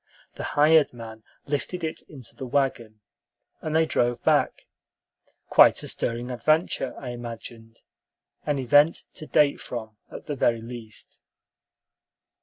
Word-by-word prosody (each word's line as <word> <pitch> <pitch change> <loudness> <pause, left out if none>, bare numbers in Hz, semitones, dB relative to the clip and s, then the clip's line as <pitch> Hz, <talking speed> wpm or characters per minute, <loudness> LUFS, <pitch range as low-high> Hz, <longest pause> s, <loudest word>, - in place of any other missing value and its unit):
The - - -7
hired 155 -1 +5
man 110 -1 -10 0.2
lifted 150 +5 -3
it 160 - -3
into 135 -6 -9
the 130 - -7
wagon, 120 -5 -1 0.6
and 155 0 -3
they 160 0 +4
drove 120 -5 0
back, - - +1 0.8
quite - - +6
a - - -6
stirring 120 +2 -2
adventure, 155 0 0
I 130 - -7
imagined; 115 -1 -9 0.6
an 145 -1 -1
event 145 +5 +4
to 155 - -9
date 145 -1 +3
from, 110 -3 -7
at - - -10
the 150 - -3
very 115 -3 +1
least. 115 -2 -11
125 Hz, 130 wpm, -25 LUFS, 115-150 Hz, 0.8 s, quite